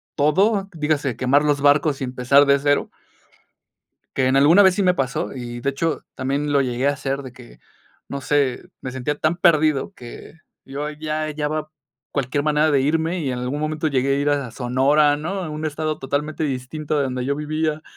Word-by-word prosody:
todo, 195 +7 +2
dígase, 150 -4 -1
quemar 135 +3 +3
los 145 -1 +1
barcos 145 0 +3
y - - -1
empezar 130 +3 +3
de 140 0 +4
cero. 145 0 +1 1.3
Que 130 -1 +2
en 130 +1 +3
alguna 160 +9 +6
vez 190 -1 +5
sí 205 - 0
me 180 -2 +4
pasó, 135 -6 -2
y 120 -2 -6
de 135 - -1
hecho 160 +4 -2
también 140 +3 -2
lo 140 - +4
llegué 125 +1 -1
a - - +4
hacer, 140 -1 -3
de 130 -3 -10
que, 125 -2 -15 0.5
no 140 - -5
sé, 140 -3 0 0.2
me 130 - -6
sentía 130 +3 -2
tan 155 +2 +1
perdido 155 -5 +2
que 120 +5 -11 0.3
yo 145 +2 -5
ya 155 0 -3
hallaba 155 0 -3 0.4
cualquier 140 +1 -1
manera 150 +1 +2
de 140 - +3
irme 160 +5 0
y 145 -5 -2
en 125 - -3
algún 125 +4 -3
momento 155 +1 -1
llegué 135 -1 +1
a - - -1
ir 145 - +1
a 140 -5 -1
Sonora, 140 +5 +2
¿no?, 185 +6 -4
a 165 - -5
un 155 +1 -5
estado 155 0 -3
totalmente 150 +3 -2
distinto 145 +3 -3
de 145 - +2
donde 130 -2 -3
yo 140 +1 0
vivía. 155 +1 -2
145 Hz, 195 wpm, -21 LUFS, 135-155 Hz, 1.3 s, alguna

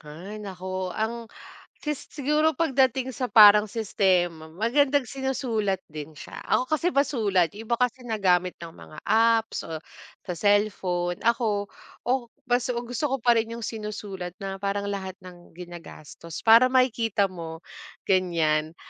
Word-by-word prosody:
Hay 175 +8 -9
naku, 185 -2 -5
ang 230 +1 -3 0.5
si 300 - -1
siguro 300 +2 0
pagdating 265 -4 +1
sa 255 -1 -3
parang 210 -3 +8
sistema 185 -7 0
magandang 260 - +1
sinusulat 240 -7 -2
din 150 0 -8
siya, 145 - -10
ako - - +2
kasi 335 +3 0
masulat 210 - +2
yung 220 +2 -10
iba 235 - +1
kasi 250 +1 -1
nagamit 185 -5 +1
ng 170 - -7
mga 155 -1 -14
apps 225 +1 +2
o 160 -1 -6 0.4
sa 180 - -5
cellphone 190 -4 +1
ako, 220 -4 +1 0.4
o 245 -2 0 0.2
baso 245 +1 +1 0.2
gusto 245 +5 -2
ko 270 - +1
pa 240 0 +4
rin 225 0 0
yung 230 - -4
sinusulat 210 -4 -6
na 195 0 -6
parang 200 0 -1
lahat 195 -1 -5
ng 175 -1 -14
ginagastos 170 -1 -10
para 230 +3 +8
makikita 230 -5 +2
mo, 165 -2 -8 0.4
ganyan. 165 -4 +1
210 Hz, 140 wpm, -25 LUFS, 180-245 Hz, 0.5 s, parang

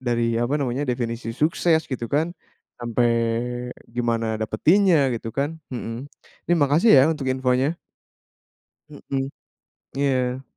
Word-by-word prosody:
dari 120 -2 0
apa 130 +5 0
namanya, 130 +1 -1
definisi 120 -1 -2
sukses 160 +2 +2
gitu 120 -2 -3
kan, 160 +4 +1 0.5
sampai 120 0 +1 0.8
gimana 115 -1 -1
dapetinnya 165 - +3 0.2
gitu 115 0 -5
kan, 145 +4 -2 0.2
mhm, 120 +3 -5 0.4
ini 175 - +4
makasih 155 +11 +4
ya - - +7
untuk 140 -4 -5
infonya. 130 +4 +1 1.1
Mhm, 135 -2 -4 0.7
iya. 130 -2 0
130 Hz, 115 wpm, -23 LUFS, 120-145 Hz, 1.1 s, ya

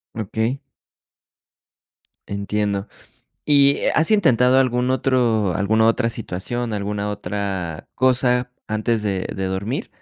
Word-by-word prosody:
Okey. 110 +5 -2 1.7
Entiendo. 100 0 -2 0.6
Y, 140 -1 +4
¿has 160 +6 +3
intentado 130 - +4
algún 125 -1 +1
otro, 120 -8 +1
alguna 110 +3 +2
otra 115 +1 +2
situación, 115 +3 -3
alguna 105 0 -2
otra 95 -4 -4
cosa 125 -1 +2
antes 110 +1 -1
de 95 -3 -2
de 95 - -3
dormir? 100 +8 -3
110 Hz, 100 wpm, -21 LUFS, 100-125 Hz, 1.7 s, Y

